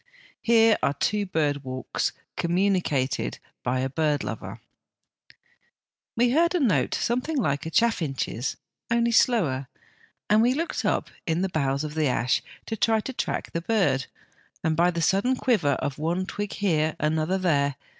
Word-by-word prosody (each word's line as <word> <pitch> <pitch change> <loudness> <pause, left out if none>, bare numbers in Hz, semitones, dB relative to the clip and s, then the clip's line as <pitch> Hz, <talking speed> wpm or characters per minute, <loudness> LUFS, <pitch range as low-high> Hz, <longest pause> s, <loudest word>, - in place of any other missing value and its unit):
Here 225 -1 +4
are 140 - +1
two 205 +7 0
bird 145 -5 0
walks 130 -1 -2 0.2
communicated 175 -7 0 0.2
by 130 +1 0
a 130 - 0
bird 150 0 0
lover: - - -6 1.6
"We 240 +1 +3
heard 340 +6 +3
a - - +2
note 245 - +2
something 255 +6 -1
like 150 - 0
a - - -2
chaffinch's, 155 - 0 0.3
only 235 0 +2
slower, 170 - +2 0.6
and 215 +1 +4
we 245 +3 +3
looked 330 +3 -2
up - - 0 0.2
in 165 +2 +1
the 190 - 0
boughs 140 -4 0
of 150 -1 -5
the 155 -1 +1
ash 125 -1 +1 0.2
to 225 - -3
try 225 +1 +2
and 230 +4 -2
track - - -3
the 170 - -2
bird 165 - +1 0.6
by 165 +2 +3
the 170 -2 -2
sudden 200 +9 +2
quiver 210 - +2
of 140 +1 -3
one 170 +4 -1
twig 205 +1 -4
here, 160 -6 +1
another, 155 +4 +1
there. 145 -7 +1
170 Hz, 155 wpm, -26 LUFS, 145-225 Hz, 1.6 s, Here